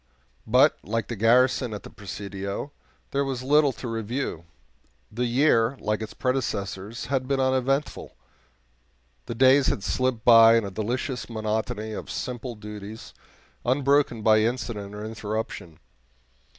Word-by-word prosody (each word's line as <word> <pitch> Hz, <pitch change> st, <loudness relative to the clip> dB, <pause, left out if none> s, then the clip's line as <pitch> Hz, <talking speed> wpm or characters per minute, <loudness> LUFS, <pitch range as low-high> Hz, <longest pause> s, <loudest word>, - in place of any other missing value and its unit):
But, -, -, +4 dB
like 115 Hz, +4 st, -3 dB
the 120 Hz, -, -3 dB
garrison 120 Hz, +2 st, +3 dB
at 105 Hz, -, -8 dB
the -, -, -11 dB
Presidio, 100 Hz, +5 st, -6 dB, 0.4 s
there 140 Hz, 0 st, +1 dB
was 130 Hz, -2 st, -3 dB
little 145 Hz, +1 st, +4 dB
to 125 Hz, -, -7 dB
review; 115 Hz, -, -3 dB, 0.7 s
the 120 Hz, +3 st, -1 dB
year, 120 Hz, -1 st, +3 dB
like 105 Hz, +1 st, -1 dB
its 110 Hz, -, -7 dB
predecessors, 110 Hz, -5 st, -3 dB
had 130 Hz, -2 st, -1 dB
been 135 Hz, 0 st, 0 dB
uneventful 130 Hz, +2 st, 0 dB, 1.1 s
the 115 Hz, -, -4 dB
days 130 Hz, +2 st, +5 dB
had 100 Hz, -, -1 dB
slipped 130 Hz, -2 st, -1 dB
by 115 Hz, -1 st, +8 dB
in 115 Hz, -, 0 dB
a 100 Hz, -, -5 dB
delicious 125 Hz, +6 st, -3 dB
monotony 110 Hz, 0 st, -3 dB
of 105 Hz, -, -6 dB
simple 125 Hz, -1 st, -5 dB
duties, 105 Hz, 0 st, -9 dB, 0.5 s
unbroken 135 Hz, -2 st, +2 dB
by 110 Hz, 0 st, +5 dB
incident 110 Hz, -3 st, -2 dB
or 105 Hz, +1 st, -6 dB
interruption. 110 Hz, -6 st, -5 dB
115 Hz, 135 wpm, -25 LUFS, 105-130 Hz, 1.1 s, by